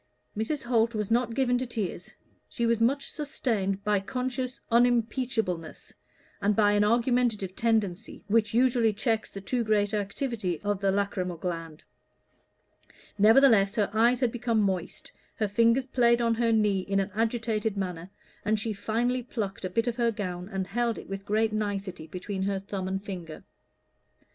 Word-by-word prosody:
Mrs. 235 +7 -2
Holt 235 -1 +1
was 210 0 -2
not 235 0 +1
given 245 -2 +2
to 255 - -3
tears; 205 -6 -4 0.4
she 235 - -2
was 230 -1 +1
much 275 +5 +1
sustained 210 -9 -2
by 210 -1 +2
conscious 255 +4 -3
unimpeachableness, 235 - 0 0.5
and 205 +1 +2
by 205 -1 +4
an 205 0 +3
argumentative 230 -4 +1
tendency 220 -3 -1
which 215 0 +2
usually 240 -2 +3
checks 220 +1 -1
the 195 - -8
too 240 +5 -1
great 210 -1 +1
activity 205 - -2
of 205 -1 -1
the 195 - +2
lachrymal 190 -3 -1
gland; 165 -2 -5 1.4
nevertheless 220 -2 +6
her 210 -4 +1
eyes 235 +3 +3
had 245 -3 +2
become 235 -1 0
moist, 190 -4 -2 0.2
her 215 - 0
fingers 230 +5 +3
played 240 -2 +3
on 230 -1 +2
her 230 0 +1
knee 210 -3 +3
in 195 +1 -1
an 195 +1 -2
agitated 225 -1 -1
manner, 180 -2 -4 0.3
and 215 +1 +1
she 220 +1 -2
finally 240 +5 -1
plucked 215 -5 -5
a 185 - -2
bit 225 +6 0
of 240 -1 -2
her 235 -1 +2
gown 185 -4 -4
and 195 -2 -2
held 235 +3 -1
it - - -10
with 195 0 -6
great 215 +1 +1
nicety 200 -6 -3
between 190 +2 -5
her 195 0 0
thumb 195 -1 -5
and 190 +1 -3
finger. 175 -6 -7
215 Hz, 165 wpm, -28 LUFS, 195-235 Hz, 1.4 s, nevertheless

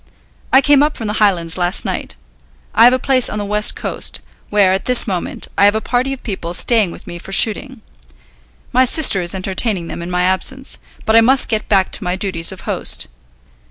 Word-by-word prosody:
I 265 - +6
came 285 0 +4
up 300 +1 0
from 225 - -6
the 210 - -3
Highlands 180 -4 0
last 175 +2 0
night. - - -4 0.6
I 230 - +5
have 245 - +7
a - - +2
place 255 -1 +1
on 210 - -5
the 205 - -4
West 210 +1 +1
Coast, - - -5 0.3
where 200 -3 +3
at 190 - -3
this 250 -1 +4
moment 185 -5 -3
I 200 - +5
have 205 +1 +3
a - - 0
party 250 +4 -2
of 270 - -7
people 175 -5 -5
staying 220 -1 +2
with - - -12
me 175 - -9
for 195 - -12
shooting. 225 +6 +1 0.9
My 255 +1 +4
sister 255 - +4
is 175 +2 -2
entertaining 190 -1 -2
them - - -7
in 170 - -7
my 180 0 -1
absence, 180 - -1 0.3
but 220 - +1
I 230 - +7
must 260 +3 +4
get 220 -2 -3
back 195 -2 +2
to - - 0
my 180 0 -2
duties 185 -4 -1
of - - -10
host. - - -2
205 Hz, 215 wpm, -16 LUFS, 180-240 Hz, 0.9 s, have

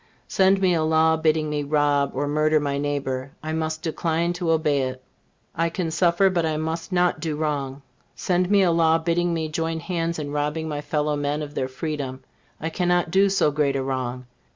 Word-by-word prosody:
Send 190 -1 +3
me 185 -2 +3
a 165 - +1
law 160 0 +3
bidding 155 -1 +1
me 150 -1 -1
rob 145 -1 +1
or 145 +2 -1
murder 155 +1 +2
my 140 -1 -2
neighbor, 140 -2 -3
I 155 0 -3
must 160 0 -2
decline 165 +1 0
to 175 -1 -3
obey 155 -3 +2
it. 130 0 -4 0.5
I 165 +1 0
can 165 -1 -3
suffer, 175 +3 +3
but 175 -2 +1
I 155 -1 0
must 160 +3 -3
not 180 -1 +2
do 160 -3 -2
wrong. 140 -3 -3 0.3
Send 180 0 0
me 200 -1 +5
a 175 - +3
law 165 -1 +4
bidding 170 +1 0
me 160 -1 -1
join 160 +1 -2
hands 170 -1 -2
in 145 -2 -4
robbing 150 +2 -2
my 145 -1 -3
fellow 150 0 -1
men 145 +1 -1
of 145 -1 -8
their 130 - -1
freedom, 135 -1 -5 0.4
I 160 - -3
cannot 175 -1 +1
do 195 +2 +4
so 190 -6 +2
great 145 -1 +1
a 135 - -1
wrong. 130 -1 -3
155 Hz, 200 wpm, -24 LUFS, 145-170 Hz, 0.5 s, me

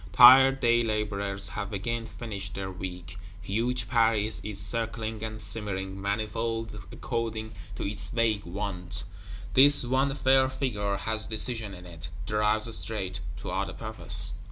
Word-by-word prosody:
Tired 135 +2 +7
day 120 -1 +2
laborers 100 -3 -3
have 100 +3 -7
again 115 +3 -4
finished 100 -5 -8
their 95 -1 -6
Week; 90 0 -9 0.2
huge 115 +5 -3
Paris 110 -2 0
is 105 -2 -7
circling 110 +1 -5
and 110 -1 -7
simmering, 100 -3 -5
manifold 110 0 -4
according 110 -1 -5 0.2
to - - -6
its 100 0 -3
vague 115 -4 0
wont; 90 -1 -6 0.5
this 140 +2 +5
one 135 +2 -1
fair 130 -1 +2
Figure 105 -7 -3
has 110 +1 -5
decision 110 -2 -4
in 90 0 -14
it; 85 -1 -11 0.2
drives 105 +1 +3
straight, 95 -4 -4 0.2
toward - - -5
a - - -9
purpose. - - +9
110 Hz, 135 wpm, -26 LUFS, 100-115 Hz, 0.5 s, purpose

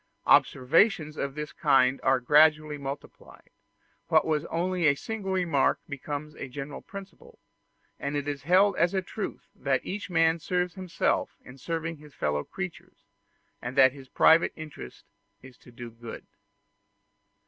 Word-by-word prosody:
Observations 155 - +3
of 140 -2 -4
this 150 0 -6
kind 135 -3 +3
are 130 0 +3
gradually 150 +2 +4
multiplied: 140 +1 -9 0.6
what 160 -2 +4
was 155 -2 0
only 175 0 0
a 140 - +4
single 205 +4 -5
remark 175 -7 +1
becomes 145 +1 -6
a - - -6
general 140 +2 -7
principle; 200 - -12 0.6
and 140 +1 -3
it 145 0 -2
is 145 -1 -3
held 185 +6 +4
as 175 +4 +2
a 190 - 0
truth 205 +3 -6
that 135 -2 -1 0.3
man 165 -1 +3
serves 180 +3 -1
himself 185 -3 -1
in 125 - -12
serving 165 +3 -4
his 150 -1 -16
fellow 75 0 -1
creatures, 185 -3 -8 0.6
and 125 +3 -6
that 130 -1 +7
his 135 -2 -13
private 165 +1 +5
interest 155 -2 -10 0.4
is 130 -1 -13
to 125 - -17
do 120 0 -9
good. 115 0 -10
150 Hz, 145 wpm, -27 LUFS, 135-175 Hz, 0.6 s, that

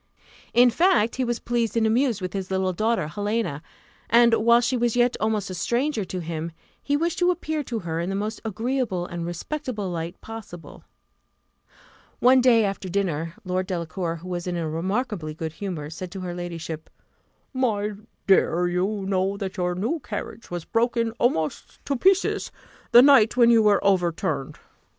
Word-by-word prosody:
In 245 0 +6
fact, 330 - +2
he 260 - +1
was 240 -1 -1
pleased 235 -1 -1
and 225 - +3
amused 230 -1 +2
with 185 - -4
his 195 -2 -4
little 190 -1 0
daughter, 220 0 0
Helena; 205 -3 -2 0.5
and 235 0 +6
whilst 235 +2 +4
she 255 - 0
was 240 -1 +1
yet 245 0 +3
almost 215 -3 -1
a - - -4
stranger 235 - 0
to 180 0 -5
him, 165 0 -5 0.3
he 285 0 0
wished 335 +2 -1
to 355 0 +3
appear 315 -3 -1
to 235 - -3
her 165 -5 -3
in 170 +2 -2
the 195 - -2
most 210 +2 -3
agreeable 225 -3 -2
and 170 -1 -5
respectable 210 - -4
light 165 0 -5
possible. 200 -8 -10 1.3
One 255 +1 +5
day 235 -3 +5
after 195 -1 -3
dinner, 170 -4 -2
Lord 185 0 -1
Delacour, 170 -1 -3
who 170 +2 -10
was 175 0 -4
in 175 -1 -2
a 165 -2 -2
remarkably 180 0 -2
good 160 -1 -5
humour, 160 -5 -5
said 180 +2 -6
to 190 - -6
her 180 -1 -4
ladyship, 170 -3 -6 0.6
"My 215 -5 0 0.3
dear, 180 -2 +3
you 190 +3 -1
know 195 +1 0
that 195 -2 -5
your 180 -1 0
new 230 - -1
carriage 230 -3 -7
was 175 -2 -5
broken 230 0 +1
almost 160 - -1
to 280 - 0
pieces 380 +8 +2 0.4
the 240 - +9
night 260 -5 +6
when 235 -1 +6
you 230 -1 +6
were 210 -2 +3
overturned. 170 -7 0
200 Hz, 175 wpm, -24 LUFS, 175-235 Hz, 1.3 s, the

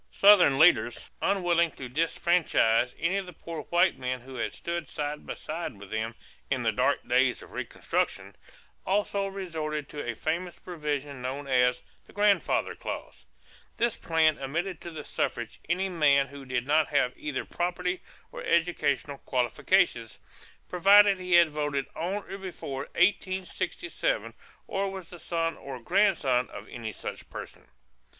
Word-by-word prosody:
Southern 195 -9 +6
leaders, 120 -7 +4
unwilling 175 -3 +2
to 130 -4 -8
disfranchise 150 -5 +2
any 185 +4 0
of 195 -2 -3
the 180 - -9
poor 165 0 -7
white 175 - +3
men 125 -1 -3
who 130 +2 -11
had 120 -3 -2
stood 170 -3 -4
side 150 0 -4
by - - -4
side 160 -7 -5
with 100 -1 -12
them 110 +1 -2 0.3
"in - - 0
the - - +3
dark - - +1
days - - +2
of - - -14
reconstruction," - - -2 0.5
also 200 0 0
resorted 160 -6 -4
to 145 - -6
a 120 -1 -3
famous 170 +7 -2
provision 145 -5 -4
known 135 +3 -4
as 125 -2 +2 0.2
"the - - -18
grandfather 205 -4 +2
clause." - - -7 0.5
This 235 -1 +1
plan 160 -2 +2
admitted 165 +6 -3
to 170 - -7
the 155 -3 -7
suffrage 120 -5 -3
any 185 +3 +1
man 150 -6 +4
who 140 0 -11
did 125 -1 -2
not 150 +2 +3
have 125 -4 +1
either 150 -3 -4
property 180 +1 -2 0.3
or - - -7
educational 165 -4 +1
qualifications, 125 - +1 0.5
provided 200 +2 +6
he 180 -1 -2
had 170 -2 +7
voted 145 -2 -1
on 190 +5 -2
or 195 - -6
before 140 -8 -5
1867 190 - 0 0.3
or 195 0 -1
was 190 -3 -8
the 175 - -10
son 165 0 -1
or 135 -2 -7
grandson 140 - +2
of - - -9
any 115 -3 -5
such 95 - -7
person. - - -9
160 Hz, 150 wpm, -28 LUFS, 135-180 Hz, 0.5 s, had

